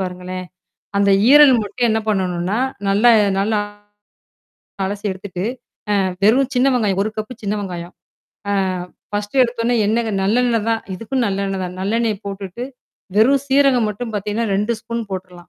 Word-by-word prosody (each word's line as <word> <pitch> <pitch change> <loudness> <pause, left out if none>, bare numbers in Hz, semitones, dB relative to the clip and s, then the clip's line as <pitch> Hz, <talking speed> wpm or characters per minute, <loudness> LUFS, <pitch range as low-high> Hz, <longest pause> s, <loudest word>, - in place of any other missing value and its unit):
பாருங்களேன். 185 0 -5 0.5
அந்த 200 0 +3 0.2
ஈரல் 290 -2 +8
மட்டும் 240 +4 -1
என்ன 220 0 +1
பண்ணணும்னா, 185 +1 -1 0.3
நல்லா 210 +5 +5 0.3
நல்லா 210 +1 +1 1.3
அலசி 200 +2 -4
எடுத்துட்டு. 185 -1 -7 0.6
அ - - +2 0.2
வெறும் 255 +5 +4
சின்ன 250 +2 +4
வெங்காயம். 200 -5 0
ஒரு 215 - -2
கப்பு 215 +3 -4
சின்ன 200 - 0
வெங்காயம். 175 -3 -6 0.6
அ - - +1 0.6
1 205 +4 -3
எடுத்தோன்னே 235 0 0
என்னங்க 225 +1 0
நல்லெண்ணெய் 230 +2 +1
தான். 225 0 0
இதுக்கும் 225 +7 -2
நல்லெண்ணெய் 195 -1 -2
தான். 180 0 -5
நல்லெண்ணெய் 215 +1 -1
போட்டுட்டு. 195 +2 -6 0.5
வெறும் 265 +5 +4
சீரகம் 270 -4 +3
மட்டும் 225 +2 -6
பார்த்தீங்கன்னா, 210 +3 -2
2 210 +4 0
ஸ்பூன் 230 0 -4
போட்டுர்றலாம். 180 -2 -7
210 Hz, 140 wpm, -19 LUFS, 195-235 Hz, 1.3 s, ஈரல்